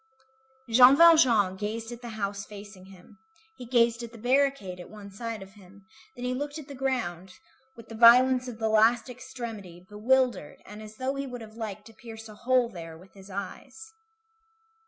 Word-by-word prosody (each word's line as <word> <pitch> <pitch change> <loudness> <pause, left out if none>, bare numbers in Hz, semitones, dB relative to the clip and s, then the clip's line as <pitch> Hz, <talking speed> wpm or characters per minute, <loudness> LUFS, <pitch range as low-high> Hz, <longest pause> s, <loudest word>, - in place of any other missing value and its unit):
Jean 250 +3 +7
Valjean 260 - +5
gazed 225 +3 -5
at 240 0 -9
the 240 - -8
house 200 -1 -3
facing 200 -2 -12
him, 195 +2 -17 0.4
he 250 -4 -11
gazed 235 -1 +2
at 235 -1 -8
the 235 - -13
barricade 250 -6 0
at 180 - -11
one 205 -2 -12
side 225 0 -6
of 195 - -15
him, 200 -1 -18 0.3
then 245 -1 -7
he 250 - -1
looked 290 +3 -5
at 305 -3 -10
the 285 - -9
ground, 235 -10 -3 0.4
with 230 -1 -14
the 225 - -11
violence 250 +3 +6
of 240 -3 -7
the 220 0 -1
last 225 +3 +3
extremity, 225 -8 -9
bewildered, 240 - 0
and 210 +1 -11
as 215 0 -11
though 260 +3 -3
he 275 0 -5
would 245 -2 -8
have 215 -1 -11
liked 215 -2 -7
to 225 - -15
pierce 225 0 -11
a 215 - -12
hole 250 +3 +1
there 165 -7 -10
with 185 +3 -18
his 195 0 -15
eyes. 440 - -8
225 Hz, 190 wpm, -27 LUFS, 200-250 Hz, 0.4 s, Jean